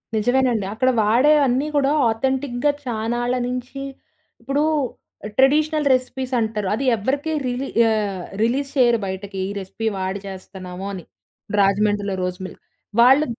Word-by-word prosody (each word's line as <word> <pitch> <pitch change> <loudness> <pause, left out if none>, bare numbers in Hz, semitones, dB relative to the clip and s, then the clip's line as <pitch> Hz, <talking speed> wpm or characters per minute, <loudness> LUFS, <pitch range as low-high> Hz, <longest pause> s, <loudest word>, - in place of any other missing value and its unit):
నిజమేనండి. 245 -1 +2
అక్కడ 255 +4 +2
వాడేవన్నీ 270 +4 +3
కూడా 280 -1 +3 0.2
ఆథెంటిక్‌గా 265 +3 0
చాన్నాళ్ళ 240 +1 -1
నుంచి 250 +2 -5 0.6
ఇప్పుడు 280 +2 0 0.7
ట్రెడిషనల్ 300 +2 +3
రెసిపీస్ 255 0 -2
అంటారు. 215 -3 -1
అది 270 - -3
ఎవరికే 275 +9 -1
రిలీ 250 +2 -2 0.2
ఆహ్, 205 -4 -1 0.2
రిలీజ్ 275 +4 0
చేయరు 240 -3 +4
బయటకి. 190 +1 -5
"ఈ - - -5
రెసిపీ 200 +4 -5
వాడి 190 +1 -2
చేస్తున్నాము" 185 -1 -8
అని. 180 - -7 0.6
రాజమండ్రిలో 200 0 +2
రోస్ 180 +1 -3
మిల్క్ - - -10 0.4
వాళ్ళు 265 +5 +6
240 Hz, 120 wpm, -21 LUFS, 205-265 Hz, 0.7 s, వాళ్ళు